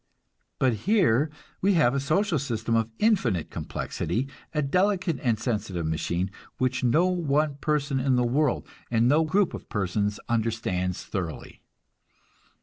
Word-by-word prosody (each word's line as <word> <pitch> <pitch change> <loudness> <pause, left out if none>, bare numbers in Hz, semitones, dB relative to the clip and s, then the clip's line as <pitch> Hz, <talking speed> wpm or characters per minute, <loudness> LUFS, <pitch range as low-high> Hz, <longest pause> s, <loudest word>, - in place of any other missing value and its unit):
But 130 -3 +3 0.2
here 155 - +4 0.3
we 195 0 +3
have 145 -7 +4
a 140 - +1
social 160 +4 +1
system 115 -3 -2
of 115 0 +1
infinite 125 - +1
complexity, 130 +4 -3 0.2
a 150 -2 0
delicate 180 0 +1
and 115 -3 +1
sensitive 105 -7 -2
machine, 85 +4 -1 0.3
which 130 0 0
no 150 +9 +4
one 155 -5 +1
person 145 -3 0
in 130 0 +2
the 125 - +3
world, 135 +3 +1 0.2
and 115 0 +3
no 150 +5 +4
group 190 +4 +2
of - - -8
persons 105 0 -1
understands 110 -6 -1
thoroughly. 90 -6 -5
130 Hz, 140 wpm, -26 LUFS, 110-155 Hz, 0.3 s, here